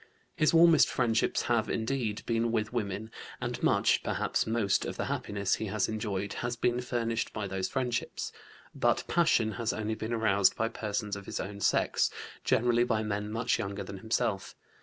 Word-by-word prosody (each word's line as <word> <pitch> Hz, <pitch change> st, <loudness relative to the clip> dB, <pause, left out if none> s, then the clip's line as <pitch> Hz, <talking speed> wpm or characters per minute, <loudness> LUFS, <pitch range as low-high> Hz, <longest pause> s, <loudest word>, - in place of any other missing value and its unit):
His 155 Hz, -, +3 dB
warmest 165 Hz, -2 st, +6 dB
friendships 115 Hz, -3 st, +1 dB
have, 120 Hz, -2 st, +1 dB
indeed, 110 Hz, -2 st, -1 dB
been 115 Hz, 0 st, +1 dB
with 110 Hz, 0 st, -1 dB
women 105 Hz, -1 st, -3 dB, 0.3 s
and -, -, -4 dB
much, -, -, +3 dB
perhaps -, -, -1 dB
most, 110 Hz, -3 st, +1 dB
of -, -, -5 dB
the -, -, -1 dB
happiness 100 Hz, -1 st, -1 dB
he 110 Hz, -, -1 dB
has 105 Hz, 0 st, 0 dB
enjoyed 100 Hz, -2 st, -3 dB
has 120 Hz, 0 st, -2 dB
been 120 Hz, +1 st, 0 dB
furnished 115 Hz, -2 st, -2 dB
by 105 Hz, -, -3 dB
those 95 Hz, -1 st, -2 dB
friendships. 125 Hz, -3 st, -2 dB, 0.4 s
But -, -, +1 dB
passion 120 Hz, -10 st, +3 dB
has 115 Hz, -, +1 dB
only 110 Hz, 0 st, -2 dB
been 110 Hz, +1 st, -5 dB
aroused 100 Hz, -4 st, +3 dB
by 115 Hz, 0 st, 0 dB
persons 105 Hz, -2 st, -3 dB
of 100 Hz, -1 st, -9 dB
his -, -, -4 dB
own 100 Hz, +1 st, -5 dB
sex, -, -, +2 dB, 0.3 s
generally 120 Hz, +1 st, +3 dB
by 110 Hz, -3 st, 0 dB
men 105 Hz, 0 st, -3 dB
much 115 Hz, +2 st, 0 dB
younger 100 Hz, -2 st, -3 dB
than 100 Hz, -, -8 dB
himself. 110 Hz, -2 st, -1 dB
110 Hz, 175 wpm, -30 LUFS, 105-120 Hz, 0.4 s, warmest